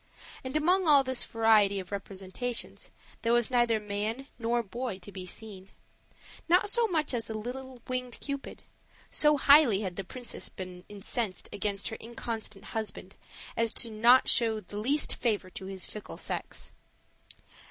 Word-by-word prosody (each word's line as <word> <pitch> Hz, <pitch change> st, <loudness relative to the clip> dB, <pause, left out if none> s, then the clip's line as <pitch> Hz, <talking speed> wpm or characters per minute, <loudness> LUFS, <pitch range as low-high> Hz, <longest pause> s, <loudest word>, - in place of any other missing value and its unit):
And 260 Hz, +3 st, -1 dB
among 355 Hz, +4 st, +3 dB
all 285 Hz, -3 st, +7 dB
this 260 Hz, -1 st, +1 dB
variety 215 Hz, -3 st, +4 dB
of 185 Hz, 0 st, -8 dB
representations 200 Hz, +4 st, -4 dB, 0.3 s
there 230 Hz, +1 st, +2 dB
was 240 Hz, +1 st, +2 dB
neither 240 Hz, -3 st, +3 dB
man 210 Hz, +5 st, -3 dB
nor 235 Hz, +1 st, +1 dB
boy 235 Hz, 0 st, -4 dB
to 195 Hz, +2 st, -11 dB
be 185 Hz, -2 st, -7 dB
seen 195 Hz, -1 st, -7 dB, 0.8 s
not 370 Hz, +4 st, +5 dB
so 475 Hz, 0 st, +4 dB
much 315 Hz, -7 st, 0 dB
as 230 Hz, -2 st, 0 dB
a 220 Hz, -, -3 dB
little 250 Hz, +2 st, -6 dB
winged 250 Hz, -1 st, -3 dB
Cupid; 280 Hz, -1 st, -6 dB, 0.5 s
so 300 Hz, -1 st, +4 dB
highly 280 Hz, -7 st, +6 dB
had 185 Hz, -4 st, -4 dB
the 195 Hz, -, -2 dB
princess 245 Hz, +6 st, -6 dB
been 180 Hz, -1 st, -8 dB
incensed 205 Hz, 0 st, -3 dB
against 200 Hz, 0 st, -2 dB
her 220 Hz, -, -6 dB
inconstant 225 Hz, -3 st, -5 dB
husband 210 Hz, -3 st, -4 dB, 0.4 s
as 230 Hz, +1 st, +3 dB
not 235 Hz, +4 st, +5 dB
to -, -, +4 dB
show 225 Hz, -2 st, +3 dB
the 205 Hz, 0 st, -9 dB
least 280 Hz, +7 st, +2 dB
favor 205 Hz, -6 st, -1 dB
to 190 Hz, -, -8 dB
his 190 Hz, -1 st, -3 dB
fickle 210 Hz, -, -8 dB
sex. -, -, -4 dB
225 Hz, 155 wpm, -30 LUFS, 200-255 Hz, 0.8 s, all